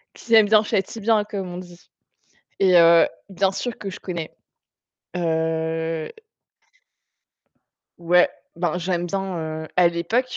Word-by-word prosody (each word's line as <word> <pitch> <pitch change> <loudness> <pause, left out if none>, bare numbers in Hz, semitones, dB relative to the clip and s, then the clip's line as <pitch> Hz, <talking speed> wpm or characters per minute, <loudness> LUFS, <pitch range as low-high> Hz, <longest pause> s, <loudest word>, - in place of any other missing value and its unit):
Qui 230 - -2
aime 220 -2 +7
bien, 215 0 +5
chatie 205 +1 -2
bien, 215 0 +2
comme 200 -3 -5
on 175 - -6
dit. 175 -1 -13 0.7
Et 185 -2 +4
heu, 165 -1 +6 0.2
bien 190 0 +1
sûr 215 +5 -4
que 195 - -6
je 185 - -9
connais. 170 -4 -6 0.8
Heu 160 -1 -1 1.9
Ouais, 175 +1 +4 0.3
ben, 175 0 -1
j'aime 175 0 -2
bien, 170 -5 -4
heu, - - -10
à 180 -1 +6
l'époque, 225 +10 -1
180 Hz, 135 wpm, -22 LUFS, 165-195 Hz, 1.9 s, aime